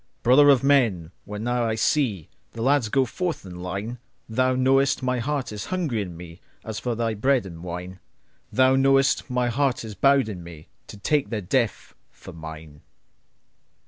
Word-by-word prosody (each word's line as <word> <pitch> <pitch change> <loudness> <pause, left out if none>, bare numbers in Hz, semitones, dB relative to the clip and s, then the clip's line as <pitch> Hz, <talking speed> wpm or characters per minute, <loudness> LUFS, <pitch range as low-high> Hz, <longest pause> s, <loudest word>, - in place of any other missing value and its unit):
Brother 140 +4 +6
of 135 -2 +5
men, 115 - +2
when 105 +1 -6
now 120 0 0
I 110 -1 0
seeThe 110 - 0 0.3
lads 125 0 +1
go 135 +3 +2
forth 170 - -4
in 90 -1 -9
line, 100 +7 -5 0.3
Thou 130 +3 +1
knowest 135 +1 +2
my 125 -1 0
heart 135 0 -2
is 105 -1 -6
hungry 165 - -2
in 90 -4 -7
meAs 90 +5 -10
for 120 -2 -2
thy 115 -1 -1
bread 130 +2 +1
and 85 -3 -9
wine; 90 +1 -7 0.5
Thou 130 +1 +4
knowest 135 +1 +3
my 125 -1 0
heart 130 -1 0
is 110 - -7
bowed 135 +5 +3
in 95 -5 -6
meTo 85 +5 -14
take 150 -2 +1
their 115 - -2
death 115 +4 -1 0.2
for - - -13
mine. 80 -2 -10
115 Hz, 165 wpm, -24 LUFS, 95-135 Hz, 0.5 s, Brother